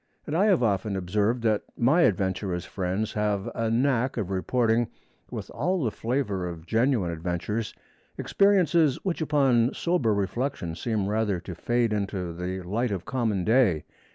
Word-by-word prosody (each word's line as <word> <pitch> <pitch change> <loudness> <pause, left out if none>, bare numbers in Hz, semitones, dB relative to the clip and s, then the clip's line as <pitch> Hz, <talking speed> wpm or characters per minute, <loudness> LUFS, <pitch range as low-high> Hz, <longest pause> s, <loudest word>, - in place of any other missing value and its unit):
And 150 - -3
I 190 +5 +4
have 185 -11 +3
often 100 -2 0
observed 105 +6 0
that 110 -2 +2 0.2
my 140 +9 +4
adventurous 95 - 0
friends 95 +4 -2
have 105 -2 -1
a 115 -1 -1
knack 125 +2 +1
of 100 -4 -2
reporting 115 +4 +1 0.4
with - - -6
all 180 0 0
the 115 - 0
flavor 110 -7 -2
of 80 -2 -9
genuine 115 -4 +1
adventures, 90 +6 -3 0.4
experiences 175 -8 +3
which 180 -3 -1
upon 135 -6 +2
sober 170 -10 +1
reflection 100 -2 -2
seem 105 +3 -2
rather 105 -3 0
to 90 - -7
fade 120 +5 0
into 95 -4 -2
the 90 +2 -4
light 115 +7 -1
of 95 -4 -4
common 110 -8 -1
day. 110 -8 +3
110 Hz, 155 wpm, -26 LUFS, 95-125 Hz, 0.4 s, I